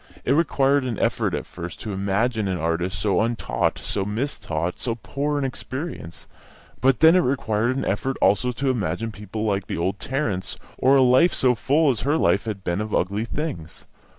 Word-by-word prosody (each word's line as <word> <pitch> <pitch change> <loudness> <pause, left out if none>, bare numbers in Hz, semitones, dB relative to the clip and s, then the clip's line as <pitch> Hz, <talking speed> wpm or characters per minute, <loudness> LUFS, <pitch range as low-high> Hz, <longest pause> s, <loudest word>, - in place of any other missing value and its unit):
It - - +1
required 140 -2 +3
an 120 -5 -3
effort - - 0
at - - -4
first 85 -1 -8
to 105 - -4
imagine 100 +3 0
an 95 -1 -1
artist 85 +1 -1
so 105 -1 +1
untaught, 115 +1 0
so 100 - -2
mistaught, 100 - -3
so 115 -2 -2
poor 145 +5 -2
in 145 - -1
experience; 130 - -6 0.5
but 130 +1 +2
then 160 +2 +8
it - - +6
required 125 -3 0
an - - -2
effort 130 +7 -1
also 105 +6 +3
to 135 +2 0
imagine 110 -1 -2
people 105 +1 -6
like 100 -2 -1
the - - -3
old 95 +4 -1
Tarrants, 115 -9 -2 0.2
or 135 +2 +5
a 135 - +6
life 130 +8 +5
so 125 -1 +3
full 145 +5 +2
as 120 - -3
her 145 +6 +1
life - - +2
had 105 -4 -5
been 85 +3 -1
of 105 0 -2
ugly 100 +5 0
things. 115 - -5
115 Hz, 190 wpm, -23 LUFS, 95-135 Hz, 0.5 s, then